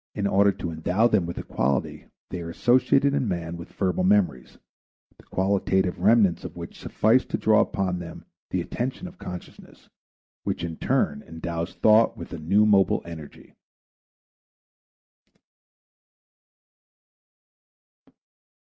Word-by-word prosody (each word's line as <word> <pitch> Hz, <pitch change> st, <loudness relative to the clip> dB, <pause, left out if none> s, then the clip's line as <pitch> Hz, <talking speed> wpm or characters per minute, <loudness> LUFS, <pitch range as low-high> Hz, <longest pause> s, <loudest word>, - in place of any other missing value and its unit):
In 100 Hz, -, -2 dB
order 100 Hz, 0 st, +4 dB
to 85 Hz, -, -5 dB
endow 90 Hz, +7 st, +1 dB
them 100 Hz, -7 st, +1 dB
with 85 Hz, -, -6 dB
a -, -, -4 dB
quality, 65 Hz, +1 st, -2 dB, 0.3 s
they 90 Hz, -, -4 dB
are 85 Hz, -, -6 dB
associated 130 Hz, +7 st, +3 dB
in 135 Hz, -4 st, 0 dB
man 85 Hz, -3 st, -3 dB
with 85 Hz, 0 st, -10 dB
verbal 95 Hz, -1 st, -1 dB
memories, 90 Hz, -9 st, +1 dB, 0.6 s
the -, -, -20 dB
qualitative 95 Hz, -1 st, 0 dB
remnants 100 Hz, -3 st, +3 dB
of -, -, -8 dB
which 85 Hz, -1 st, -9 dB
suffice 115 Hz, +4 st, +2 dB
to -, -, -3 dB
draw 110 Hz, -1 st, +3 dB
upon 95 Hz, -2 st, -1 dB
them 85 Hz, -1 st, -9 dB, 0.2 s
the -, -, -1 dB
attention 130 Hz, +9 st, -4 dB
of 180 Hz, +1 st, -14 dB
consciousness 90 Hz, -1 st, -10 dB, 0.5 s
which -, -, -3 dB
in 85 Hz, -1 st, -4 dB
turn -, -, 0 dB
endows 85 Hz, +1 st, -5 dB
thought 110 Hz, +1 st, +4 dB
with -, -, -9 dB
a 85 Hz, -, -6 dB
new 100 Hz, +7 st, +3 dB
mobile 100 Hz, -2 st, +3 dB
energy. 80 Hz, -4 st, -11 dB
95 Hz, 130 wpm, -25 LUFS, 85-105 Hz, 0.6 s, order